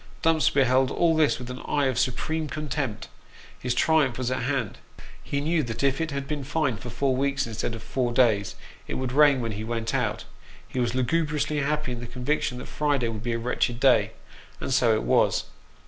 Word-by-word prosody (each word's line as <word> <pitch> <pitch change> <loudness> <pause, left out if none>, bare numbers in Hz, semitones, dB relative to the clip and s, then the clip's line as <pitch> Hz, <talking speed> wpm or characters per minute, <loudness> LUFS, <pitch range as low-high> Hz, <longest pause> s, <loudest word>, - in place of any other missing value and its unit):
Dumps 165 -1 +4
beheld 130 -1 +3
all 165 +3 +2
this 155 -2 +3
with 125 0 -7
an 125 - -7
eye 145 -1 +1
of 130 -2 0
supreme 150 +5 -1
contempt 140 -5 -3 0.5
his 125 -1 -1
triumph 150 -4 +3
was 130 -1 -2
at 130 - -1
hand. 125 -5 -2 0.4
He 140 - -2
knew 160 +3 +1
that 120 -1 -4
if 135 +2 +2
it 165 - -1
had 140 -2 -4
been 145 -1 -3
fine 145 -4 0
for 120 - -8
four 130 +3 0
weeks 140 +1 0
instead 115 0 -3
of 115 - -9
four 125 0 -1
days, 115 -5 +2 0.3
it - - -4
would 130 -1 -2
rain 140 -1 +5
when 115 -1 -2
he 105 +1 -5
went 115 0 -3
out; - - -1 0.4
he 130 - -4
was 120 0 0
lugubriously 150 +3 0
happy 150 -1 -1
in 120 - -4
the 120 - -7
conviction 125 +1 -1
that 125 - -7
Friday 145 -5 0
would 110 -2 -5
be 120 0 -2
a - - 0
wretched 120 0 -1
day 130 0 +4 0.5
and - - -2
so 125 -3 +4
it 110 - -1
was. - - +3
130 Hz, 210 wpm, -26 LUFS, 120-145 Hz, 0.5 s, rain